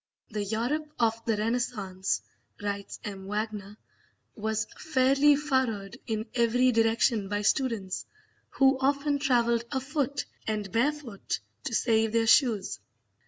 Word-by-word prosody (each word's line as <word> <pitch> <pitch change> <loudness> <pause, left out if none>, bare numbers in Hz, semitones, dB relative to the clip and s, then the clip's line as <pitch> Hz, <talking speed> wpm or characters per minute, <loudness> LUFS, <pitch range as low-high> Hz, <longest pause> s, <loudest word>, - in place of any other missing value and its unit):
"The 210 -1 -2
Europe 245 +9 -2
of 230 -1 +1
the 225 -2 +1
Renaissance," 210 -4 -1 0.4
writes 200 -1 -4
M. 195 -2 -6
Wagner, 210 -1 -4 0.6
"was 220 0 -1
fairly 275 0 +4
furrowed 260 -9 -1
in 220 -1 -2
every 245 +2 +3
direction 225 -2 +2
by 205 0 -1
students, 220 -6 0 0.4
who 270 -1 +3
often 280 +1 +1
travelled 235 -3 +2
afoot 285 +1 -1 0.2
and 210 -3 -2
barefoot 250 -3 -1 0.3
to - - -1
save 225 -1 +2
their 230 0 +3
shoes." 225 - +3
230 Hz, 120 wpm, -28 LUFS, 210-265 Hz, 0.6 s, fairly